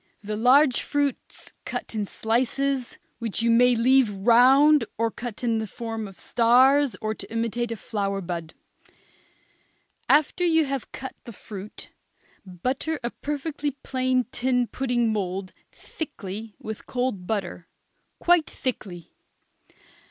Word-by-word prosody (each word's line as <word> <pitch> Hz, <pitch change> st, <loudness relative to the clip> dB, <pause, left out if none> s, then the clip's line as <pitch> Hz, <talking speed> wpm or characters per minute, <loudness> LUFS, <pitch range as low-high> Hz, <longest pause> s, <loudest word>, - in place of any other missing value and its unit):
The 210 Hz, +1 st, -3 dB
large 255 Hz, +4 st, +5 dB
fruits 285 Hz, -2 st, -2 dB
cut -, -, -5 dB
in 215 Hz, -2 st, -1 dB
slices, 255 Hz, +4 st, -1 dB, 0.2 s
which 230 Hz, -1 st, -2 dB
you 235 Hz, -, +3 dB
may 245 Hz, +1 st, +5 dB
leave 255 Hz, +1 st, +4 dB
round 250 Hz, +8 st, +5 dB
or 230 Hz, +1 st, +1 dB
cut 240 Hz, 0 st, -7 dB
in 230 Hz, -2 st, +1 dB
the 220 Hz, -, -3 dB
form 225 Hz, 0 st, -5 dB
of 195 Hz, -2 st, -13 dB
stars 255 Hz, +2 st, +4 dB
or 215 Hz, 0 st, -2 dB
to -, -, -10 dB
imitate 230 Hz, +1 st, -1 dB
a -, -, -2 dB
flower 200 Hz, -2 st, -3 dB
bud. 170 Hz, -3 st, -5 dB, 1.5 s
After 305 Hz, +4 st, +3 dB
you 325 Hz, -2 st, +4 dB
have 275 Hz, -2 st, -4 dB
cut 265 Hz, -, -7 dB
the 235 Hz, -, -8 dB
fruit, 205 Hz, -1 st, -10 dB, 0.5 s
butter 255 Hz, -, -3 dB
a 240 Hz, -, -2 dB
perfectly 295 Hz, 0 st, -3 dB
plain 255 Hz, -1 st, +1 dB
tin 250 Hz, -1 st, +1 dB
pudding 240 Hz, -3 st, 0 dB
mould 190 Hz, -2 st, -3 dB, 0.2 s
thickly 220 Hz, -, -7 dB
with 220 Hz, -1 st, -8 dB
cold 245 Hz, -8 st, -2 dB
butter, 200 Hz, -5 st, -3 dB, 0.5 s
quite 345 Hz, -2 st, +3 dB
thickly. 190 Hz, -, -5 dB
235 Hz, 130 wpm, -25 LUFS, 215-265 Hz, 1.5 s, large